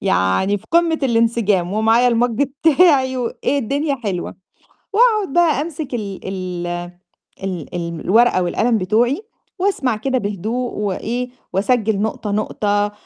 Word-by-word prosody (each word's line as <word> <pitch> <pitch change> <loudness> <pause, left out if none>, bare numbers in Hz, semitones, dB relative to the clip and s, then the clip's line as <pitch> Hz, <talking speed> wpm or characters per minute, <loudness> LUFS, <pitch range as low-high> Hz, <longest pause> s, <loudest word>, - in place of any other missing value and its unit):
يعني 140 - +1
في - - -23
قمة 335 -1 +3
الانسجام 230 -7 +1
ومعايا 225 +3 +3
الMug 240 +1 +2
بتاعي 280 +2 +3
وإيه 255 +3 -1
الدنيا 280 +3 -1
حلوة، 185 -4 -3 0.6
وأقعد 430 - +3
بقى 335 -5 +3
أمسِك 305 -3 -5
ال 205 -5 -4
ال 180 -2 -4 0.8
ال 180 -4 -5
ال 170 -1 -4
الورقة 225 -2 +3
والقلم 225 +6 +1
بتوعي، 230 - +1 0.4
وأسمع 290 - +1
كده 260 +4 -1
بهدوء 220 +4 -3
وإيه، 225 +5 -3 0.2
وأسجِّل 220 +1 +1
نقطة، 215 -1 -2
نقطة 205 0 0
230 Hz, 125 wpm, -19 LUFS, 200-270 Hz, 0.8 s, قمة